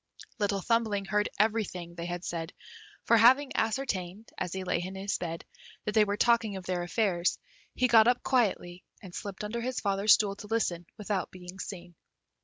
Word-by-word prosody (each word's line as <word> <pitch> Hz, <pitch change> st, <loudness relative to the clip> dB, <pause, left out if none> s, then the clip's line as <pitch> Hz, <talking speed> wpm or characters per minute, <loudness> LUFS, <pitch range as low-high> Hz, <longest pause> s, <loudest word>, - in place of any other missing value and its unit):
Little 200 Hz, -1 st, 0 dB
Thumbling 220 Hz, -2 st, +1 dB
heard 210 Hz, +2 st, +1 dB
everything 205 Hz, -5 st, 0 dB
they 170 Hz, 0 st, -6 dB
had 175 Hz, 0 st, -5 dB
said, 165 Hz, 0 st, -4 dB, 0.5 s
for 230 Hz, -, +4 dB
having 260 Hz, +5 st, +6 dB
ascertained, 220 Hz, -4 st, -2 dB
as 180 Hz, -2 st, -3 dB
he 190 Hz, +1 st, -4 dB
lay 175 Hz, -2 st, 0 dB
in 185 Hz, +2 st, -6 dB
his 195 Hz, +1 st, -2 dB
bed, 165 Hz, -1 st, -5 dB, 0.4 s
that 210 Hz, -, 0 dB
they 215 Hz, -1 st, +5 dB
were 205 Hz, 0 st, -2 dB
talking 230 Hz, -3 st, +3 dB
of 190 Hz, -2 st, -7 dB
their 180 Hz, -1 st, -1 dB
affairs, 175 Hz, -1 st, 0 dB, 0.4 s
he 255 Hz, -, +3 dB
got 225 Hz, -1 st, +6 dB
up 245 Hz, 0 st, +2 dB
quietly, 190 Hz, -8 st, 0 dB, 0.2 s
and 185 Hz, -3 st, -10 dB
slipped 200 Hz, +1 st, -6 dB
under 225 Hz, +3 st, -3 dB
his 255 Hz, +1 st, -2 dB
father's 200 Hz, +1 st, +4 dB
stool 200 Hz, -2 st, -1 dB
to 210 Hz, -, -9 dB
listen, 180 Hz, -6 st, -1 dB
without 205 Hz, -2 st, -2 dB
being 180 Hz, +1 st, -11 dB
seen. 175 Hz, -3 st, -7 dB
200 Hz, 185 wpm, -29 LUFS, 180-225 Hz, 0.5 s, having